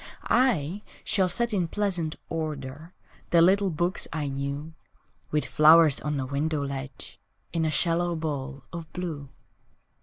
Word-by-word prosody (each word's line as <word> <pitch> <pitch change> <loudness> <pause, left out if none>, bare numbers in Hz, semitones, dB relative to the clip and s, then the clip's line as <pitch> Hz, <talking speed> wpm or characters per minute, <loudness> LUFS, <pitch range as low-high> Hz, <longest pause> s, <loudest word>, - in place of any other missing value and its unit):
I 200 - +2 0.2
shall 190 -2 +2
set 235 +5 +1
in 180 -4 +1
pleasant 180 -5 -1
order 155 -1 -5 0.4
The 170 - +5
little 190 +3 +5
books 175 +3 -1
I 150 -3 -2
knew, 140 +3 -4 0.6
With 150 0 0
flowers 155 -1 +6
on 150 -1 -2
the 135 - -2
window 145 +2 -1
ledge 135 -1 -7 0.3
In 165 -1 +1
a - - +2
shallow 170 +3 +1
bowl 145 -3 -4
of 165 -2 -7
blue. 160 -6 -5
160 Hz, 140 wpm, -27 LUFS, 145-175 Hz, 0.6 s, flowers